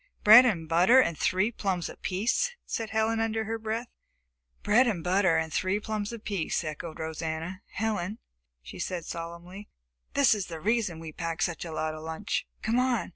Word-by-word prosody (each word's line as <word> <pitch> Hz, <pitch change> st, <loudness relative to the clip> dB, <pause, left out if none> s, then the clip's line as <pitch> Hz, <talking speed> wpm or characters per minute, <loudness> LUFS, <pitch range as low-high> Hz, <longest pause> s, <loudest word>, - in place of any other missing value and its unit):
"Bread 235 Hz, +4 st, +10 dB
and 170 Hz, -8 st, -1 dB
butter 180 Hz, +10 st, +5 dB
and 170 Hz, -10 st, +2 dB
three 190 Hz, +8 st, +1 dB
plums 190 Hz, -6 st, -2 dB
apiece," 235 Hz, -, -1 dB
said 225 Hz, -1 st, -3 dB
Helen 220 Hz, +1 st, +1 dB
under 225 Hz, 0 st, 0 dB
her 225 Hz, +1 st, -3 dB
breath. 220 Hz, +2 st, -3 dB, 0.8 s
"Bread 240 Hz, +5 st, +4 dB
and 185 Hz, -8 st, -1 dB
butter 185 Hz, -2 st, +3 dB
and 160 Hz, -1 st, -2 dB
three 190 Hz, +2 st, 0 dB
plums 210 Hz, 0 st, -3 dB
apiece," 205 Hz, -8 st, -2 dB
echoed 155 Hz, +1 st, -6 dB
Rosanna. 160 Hz, +3 st, -4 dB
"Helen," 210 Hz, -2 st, -2 dB, 0.5 s
she 65 Hz, -, -10 dB
said 175 Hz, -3 st, -3 dB
solemnly, 170 Hz, +4 st, -8 dB, 0.5 s
"this 280 Hz, -5 st, +5 dB
is 205 Hz, -4 st, -3 dB
the 165 Hz, -2 st, -7 dB
reason 210 Hz, -2 st, 0 dB
we 160 Hz, -1 st, -7 dB
packed 165 Hz, +1 st, -3 dB
such 175 Hz, 0 st, -2 dB
a 165 Hz, -, -6 dB
lot 155 Hz, 0 st, -2 dB
of 155 Hz, -, -8 dB
lunch. 160 Hz, +7 st, -3 dB, 0.2 s
Come 230 Hz, +3 st, +2 dB
on!" 250 Hz, -3 st, +1 dB
195 Hz, 175 wpm, -28 LUFS, 165-220 Hz, 0.8 s, Bread